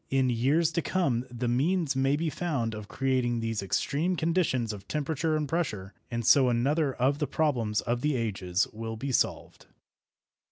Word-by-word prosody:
In 130 -2 +2
years 145 +8 +2
to 170 - 0
come 135 -10 0
the 120 0 -3
means 145 +4 +1
may 135 +1 +2
be 160 +1 -1
found 140 -11 -2
of 105 -1 -7
creating 130 -2 0
these 115 -2 -2
extreme 150 - 0
conditions 160 -9 0
of 100 -1 -10
temperature 155 +3 -1
and 150 -1 -2
pressure, 110 - -2 0.2
and 115 -2 -3
so 130 +1 +6
another 135 +4 +1
of 135 +4 +1
the 150 - 0
problems 125 -8 0
of 120 +1 -2
the 150 0 +1
ages 95 -5 0
will 110 +1 -5
be 135 +4 -3
solved. - - -1
130 Hz, 170 wpm, -28 LUFS, 115-155 Hz, 0.2 s, so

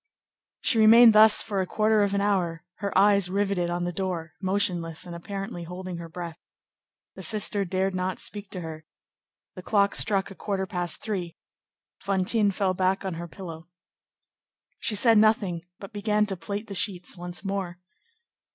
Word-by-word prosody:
She 230 - +2
remained 225 +1 +8
thus 215 0 +7
for 200 -3 -2
a 185 - -3
quarter 215 +1 +2
of 200 -1 +1
an 200 - +1
hour, 180 -5 0
her 200 -3 -2
eyes 200 -2 +4
riveted 195 -2 0
on 175 0 -2
the 175 - -2
door, 175 -4 -4
motionless 180 -4 -1
and 175 -1 -8
apparently 195 +2 -6
holding 180 +1 -7
her 170 -1 -8
breath. 170 0 -7 0.7
The - - -10
sister 210 -1 +2
dared 190 +1 -1
not 185 0 -2
speak 205 -1 -6
to 185 - -6
her. 160 -1 -8 0.7
The 185 - -9
clock 200 +1 +2
struck 200 -2 +1
a - - -10
quarter 190 +1 -3
past 175 -3 -2
three. 185 -6 -4 0.6
Fantine 200 +2 +1
fell 195 -1 0
back 185 +1 0
on 190 - -2
her 170 +1 -6
pillow. 165 -2 -10 1.1
She 215 - 0
said 225 +1 +5
nothing, 200 -6 +1
but 200 +2 -11
began 210 0 +1
to 200 -2 -3
plait 200 +5 -5
the 205 - -8
sheets 190 -4 -1
once 175 +2 -8
more. 195 -2 -3
195 Hz, 170 wpm, -26 LUFS, 175-205 Hz, 1.1 s, remained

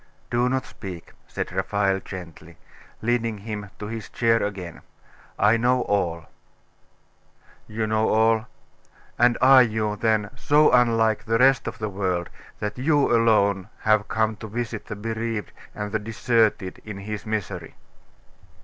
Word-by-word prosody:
'Do 120 +1 +2
not 130 0 -1
speak,' 90 -5 -9
said - - -4
Raphael 95 +1 0
gently, 85 -3 -10 0.5
leading 115 -2 0
him 105 -1 -6
to 105 - -6
his 110 0 -6
chair 115 -1 +2
again. 95 -4 -5 0.6
'I 105 +3 +4
know 125 +2 +2
all.' 85 -5 -1 1.4
'You 110 +1 -2
know 110 0 +1
all? 110 +1 +3 0.7
And 120 0 +4
are 130 0 +8
you, 110 -3 0
then, 110 -1 +1
so 150 +3 +4
unlike 115 -3 +3
the 115 +1 +1
rest 135 +2 +4
of 115 0 -5
the 110 - -3
world, 95 -3 -2 0.3
that 105 +3 -4
you 145 -2 +3
alone 100 -4 +2
have 110 -1 +2
come 110 0 0
to 110 - -8
visit 115 0 -5
the 110 - -5
bereaved 115 -1 -4 0.2
and 105 0 -4
the 110 - 0
deserted 110 -3 0
in 105 -2 -7
his 105 +2 -6
misery? 100 -6 -4
110 Hz, 140 wpm, -24 LUFS, 100-115 Hz, 1.4 s, are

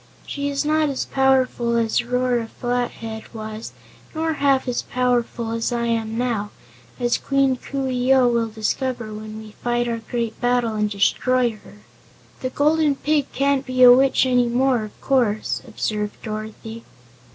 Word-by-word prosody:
She 285 0 -3
is 280 +1 -1
not 310 0 +2
as 275 - -2
powerful 260 -3 +2
as 230 +1 +1
Rora 245 -1 0
Flathead 235 -2 -4
was, 220 0 -6 0.4
nor 320 0 0
half 275 -3 +2
as 245 - -1
powerful 245 -2 -1
as 230 +1 -1
I 235 -1 -1
am 225 -1 -1
now, 230 -4 -1 0.5
as 240 -1 +1
Queen 275 -1 +2
Coo 270 +1 -4
ee 255 0 0
oh 260 -2 +5
will 235 -1 +1
discover 225 +1 -3
when 215 0 -8
we 220 -1 -10
fight 240 0 0
our 230 -1 -2
great 230 0 -4
battle 245 -2 +1
and 210 -1 0
destroy 240 +5 +2
her." 105 - -16 0.6
"The 255 - -2
Golden 300 +1 +2
Pig 295 0 0
can't 275 0 +1
be 255 -1 +2
a 245 - +11
witch 265 +1 +4
any 250 -1 +3
more, 245 -1 +2
of 210 - -14
course," 235 -6 +1
observed 210 -2 -3
Dorothy. 220 +1 -7
245 Hz, 160 wpm, -22 LUFS, 225-265 Hz, 0.6 s, a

